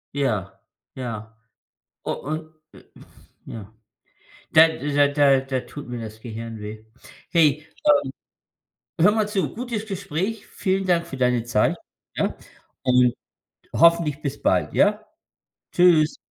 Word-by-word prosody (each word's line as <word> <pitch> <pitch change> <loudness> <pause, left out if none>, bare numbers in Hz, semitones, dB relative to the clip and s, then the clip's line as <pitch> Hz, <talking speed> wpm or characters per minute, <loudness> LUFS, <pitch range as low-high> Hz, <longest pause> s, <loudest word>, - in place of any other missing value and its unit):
Ja, 105 -9 -2 0.3
ja. 115 -3 -6 0.7
U - - -1
und, 155 +2 -5 0.2
äh - - -16 0.6
ja. 110 -1 -9 0.8
Da 160 +1 +8
da 145 -2 +1
da 140 -1 +4
da 130 -1 -2
tut 145 +3 -10
mir 120 -1 -5
das 110 -1 -8
Gehirn 115 -1 -7
weh. 105 +1 -8 0.5
Hey, 155 -3 +3 1.3
ähm, 165 - +3
hör 205 - +7
mal 215 -1 +1
zu, 195 -7 -1
gutes 230 -2 -4
Gespräch. 200 +1 -4
Vielen 190 -1 -1
Dank 170 -1 +2
für 135 -5 -8
deine 125 -2 +2
Zeit, 115 -2 +1 0.4
ja? - - -1 0.5
Und 125 -1 +4 0.6
hoffentlich 165 -3 +4
bis 140 -2 -4
bald, - - +1
ja? 210 +1 +3 0.7
Tschüss. 170 -3 +4
145 Hz, 125 wpm, -23 LUFS, 120-170 Hz, 1.3 s, Da